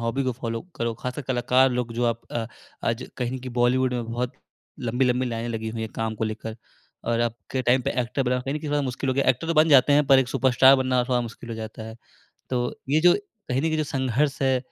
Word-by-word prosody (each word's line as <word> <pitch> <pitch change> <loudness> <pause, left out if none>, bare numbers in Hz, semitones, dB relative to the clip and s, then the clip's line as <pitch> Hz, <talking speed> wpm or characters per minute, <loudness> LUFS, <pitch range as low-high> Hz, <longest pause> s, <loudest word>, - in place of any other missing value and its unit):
Hobby 115 +4 -1
को 130 - 0
follow 115 -1 -4 0.2
करो। 115 0 -1
खासकर 125 +5 -5
कलाकार 130 +1 +3
लोग 125 -1 -2
जो 120 +1 0
आप 115 -1 0
अ, 115 -1 -2 0.4
आज 115 +2 -1
कहें 125 +1 -2
कि 130 - -6
बॉलीवुड 125 +1 +2
में 120 -1 -2
बहुत 120 +1 -2 0.5
लंबी-लंबी 125 +1 +1
लाइनें 115 -1 -3
लगी 110 -1 -3
हुई 110 +1 -5
हैं 110 -1 -4
काम 110 -1 -2
को 110 - -2
लेकर 110 0 -5 0.5
और 115 0 0
अब 120 -1 0 0.2
के 130 - -1
टाइम 125 +1 +3
पे - - -1
एक्टर 125 +3 -1
बनना 125 0 0
कहीं 135 +3 -3
न - - -1
कहीं 150 -1 -5
थोड़ा 145 0 +2
मुश्किल 130 0 -3
हो - - 0
गया 140 - +1
है। - - +6
एक्टर 130 +5 -3
तो 165 - 0
बन 155 +1 +5
जाते 145 -1 +6
हैं, 145 0 +4
पर 135 -1 +7
एक 130 -2 +1
सुपरस्टार 130 0 +5
बनना 130 -1 +1
थोड़ा 125 -1 +1
मुश्किल 120 0 -8
हो - - -3
जाता 110 0 -7
है। 110 0 -8 0.5
तो 125 -1 -1
ये 150 +3 +4
जो 175 +1 +7
कही 210 - -4
न - - -4
कहीं 160 -1 +1
जो 155 - +1
संघर्ष 135 0 -1
है 130 -1 +3
125 Hz, 255 wpm, -25 LUFS, 115-135 Hz, 0.5 s, पर